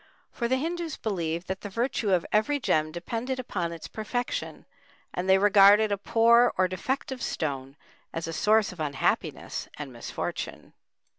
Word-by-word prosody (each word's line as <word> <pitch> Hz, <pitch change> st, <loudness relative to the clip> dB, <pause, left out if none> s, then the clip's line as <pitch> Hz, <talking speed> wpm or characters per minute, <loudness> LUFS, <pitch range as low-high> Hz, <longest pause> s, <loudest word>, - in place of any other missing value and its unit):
For 235 Hz, -, -2 dB
the 260 Hz, -, +2 dB
Hindus 330 Hz, +2 st, -3 dB
believed 170 Hz, -4 st, -2 dB
that 190 Hz, +1 st, -4 dB
the 205 Hz, -, -6 dB
virtue 230 Hz, 0 st, -1 dB
of 180 Hz, -3 st, +2 dB
every 250 Hz, +8 st, +2 dB
gem 155 Hz, -, +1 dB
depended 230 Hz, +10 st, -3 dB
upon 180 Hz, -9 st, -3 dB
its 165 Hz, -1 st, -7 dB
perfection, 245 Hz, +3 st, -4 dB, 0.5 s
and 180 Hz, +1 st, -3 dB
they 190 Hz, -, +7 dB
regarded 205 Hz, +1 st, +6 dB
a -, -, +3 dB
poor 235 Hz, +3 st, +4 dB
or 185 Hz, -, +4 dB
defective 255 Hz, +7 st, -3 dB
stone 135 Hz, -3 st, -3 dB, 0.4 s
as 165 Hz, 0 st, -4 dB
a 165 Hz, -, -4 dB
source 215 Hz, +4 st, +3 dB
of 180 Hz, -, -13 dB
unhappiness 145 Hz, -3 st, -1 dB
and 140 Hz, -4 st, -7 dB
misfortune. 120 Hz, -, -5 dB
200 Hz, 155 wpm, -27 LUFS, 170-235 Hz, 0.5 s, they